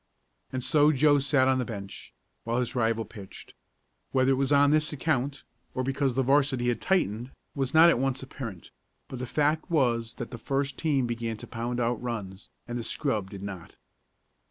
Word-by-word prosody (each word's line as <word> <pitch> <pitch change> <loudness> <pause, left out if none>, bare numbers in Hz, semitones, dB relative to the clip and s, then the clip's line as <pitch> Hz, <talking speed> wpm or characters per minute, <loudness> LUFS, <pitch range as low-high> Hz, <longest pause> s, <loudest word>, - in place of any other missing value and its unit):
And 130 -1 -3
so 150 +2 +5
Joe 145 0 +4
sat 140 -1 +3
on 130 -1 +3
the - - +1
bench, 100 -5 -8 0.3
while 115 +2 0
his 125 - -2
rival 115 -2 +1
pitched. 100 -2 -12 0.6
Whether 130 0 +3
it - - +5
was 135 +1 0
on 145 0 +5
this 155 0 +2
account, 140 -2 -1 0.3
or 130 - 0
because 135 -1 0
the 135 - +2
'varsity 135 -2 +2
had 120 - -1
tightened, 125 - 0 0.2
was 135 0 -2
not 165 +2 +9
at 120 - +1
once 135 0 -1
apparent, 115 -9 -8 0.4
but 130 - -6
the 125 - -4
fact 150 +5 0
was 120 -7 +1
that 120 - -6
the 120 - -7
first 140 +3 -2
team 145 -6 +1
began 115 -1 -3
to - - -9
pound 120 +1 -4
out 120 -1 0
runs, 105 -6 -5 0.2
and 120 0 -3
the - - -4
scrub 110 -8 -2
did 100 -1 -9
not. 95 -4 -8
130 Hz, 190 wpm, -28 LUFS, 115-140 Hz, 0.6 s, not